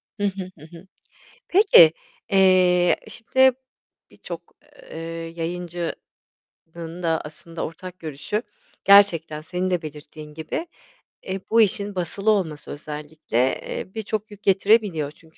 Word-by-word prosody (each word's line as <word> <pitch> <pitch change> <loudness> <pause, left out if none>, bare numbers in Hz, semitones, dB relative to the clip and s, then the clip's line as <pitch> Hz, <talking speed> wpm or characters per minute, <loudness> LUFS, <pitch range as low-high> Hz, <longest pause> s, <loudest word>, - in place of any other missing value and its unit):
Hı 205 - -5
hı. 190 -2 -2
Hı 155 - -12
hı. 185 +3 -16 0.6
Peki, 355 - +7 0.4
eee, 185 -2 +5
şimdi 260 +3 +3 0.6
birçok, - - -8 0.5
eee, - - -7 0.4
yayıncının 175 0 -5 0.9
da 160 -1 +1
aslında 160 +2 -7
ortak 180 +2 -9
görüşü, 160 +7 -3 0.4
gerçekten 170 -6 +5
senin 180 +3 -2
de 180 -2 0
belirttiğin 150 0 -10
gibi, 160 - -4 0.6
eee, 190 +1 -4
bu 230 +1 +5
işin 205 -2 +1
basılı 195 +4 0
olması, 165 -8 -2
özellikle, 150 -3 -6 0.2
eee, 185 - -6
birçok 215 -1 -3
yük 205 0 -13
getirebiliyor. 195 -6 +3
Çünkü 160 +1 -22
180 Hz, 115 wpm, -23 LUFS, 160-200 Hz, 0.9 s, Peki